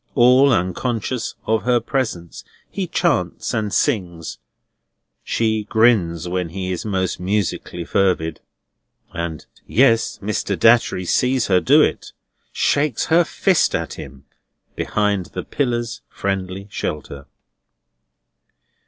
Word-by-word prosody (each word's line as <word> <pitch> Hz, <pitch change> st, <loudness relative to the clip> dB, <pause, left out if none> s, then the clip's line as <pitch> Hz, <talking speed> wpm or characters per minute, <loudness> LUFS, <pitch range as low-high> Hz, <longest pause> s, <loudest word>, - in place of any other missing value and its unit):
All 130 Hz, +3 st, +6 dB
unconscious 115 Hz, +5 st, -1 dB
of 110 Hz, -1 st, +1 dB
her 120 Hz, -1 st, +2 dB
presence, 115 Hz, -, -3 dB, 0.3 s
he -, -, -3 dB
chants -, -, 0 dB
and 105 Hz, -2 st, -1 dB
sings. 90 Hz, -, -1 dB, 0.8 s
She 110 Hz, -2 st, 0 dB
grins 105 Hz, -8 st, +2 dB
when 90 Hz, -1 st, -2 dB
he 95 Hz, +2 st, -4 dB
is 90 Hz, -, -3 dB
most 95 Hz, -4 st, -2 dB
musically 90 Hz, -2 st, -2 dB
fervid, 90 Hz, -5 st, 0 dB, 0.7 s
and—yes, 95 Hz, -, 0 dB
Mr. 100 Hz, -2 st, -2 dB
Datchery 115 Hz, -2 st, +3 dB
sees 125 Hz, +6 st, +1 dB
her 90 Hz, -2 st, +4 dB
do -, -, +5 dB
it!—shakes 145 Hz, -5 st, -2 dB
her 175 Hz, +1 st, +6 dB
fist 180 Hz, +2 st, +1 dB
at -, -, -3 dB
him 65 Hz, 0 st, -10 dB, 0.5 s
behind 100 Hz, -3 st, 0 dB
the 90 Hz, -, -6 dB
pillar's 120 Hz, -4 st, -2 dB
friendly 95 Hz, 0 st, -3 dB
shelter. 70 Hz, -5 st, -5 dB
100 Hz, 105 wpm, -20 LUFS, 90-120 Hz, 0.8 s, All